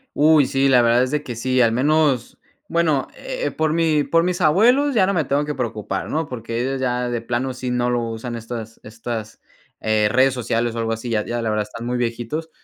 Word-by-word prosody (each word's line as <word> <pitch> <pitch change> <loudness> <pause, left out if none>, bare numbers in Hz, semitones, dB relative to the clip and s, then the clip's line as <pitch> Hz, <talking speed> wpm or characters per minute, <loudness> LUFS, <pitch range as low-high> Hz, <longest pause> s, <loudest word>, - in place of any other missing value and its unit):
Uy, 150 -1 +5
sí, 135 +1 +1
la 125 -2 +5
verdad 120 +2 +4
es 130 - -5
de 150 - 0
que 120 -5 -7
sí, 130 +2 0
al 115 - +5
menos, 140 0 +1 0.3
bueno, 160 -5 +1
eh, - - -4
por 155 -1 0
mi 160 -2 +2
por 165 +3 +2
mis 180 0 -1
abuelos 240 - +4
ya 190 -6 +3
no 200 - 0
me 160 -4 +1
tengo 140 +3 0
que 150 0 -3
preocupar, 110 -6 -3
¿no? 160 0 -1
Porque 115 -1 -4
ellos 135 +1 -2
ya 125 -1 -1
de 120 -1 -2
plano 125 +2 -2
sí 125 0 -4
no 125 0 0
lo 120 -1 +1
usan 115 +2 -5
estas 115 -1 -7
estas, 115 0 -6 0.4
eh, 110 -1 +1
redes 130 +2 +3
sociales 115 -1 -1
o - - -4
algo 115 - -1
así, 115 +2 -4
ya 105 -2 0
ya 120 0 -3
la 115 -1 -1
verdad 105 0 0
están 115 +1 -7
muy 125 - -1
viejitos. 120 +7 -3
125 Hz, 230 wpm, -21 LUFS, 115-150 Hz, 0.4 s, Uy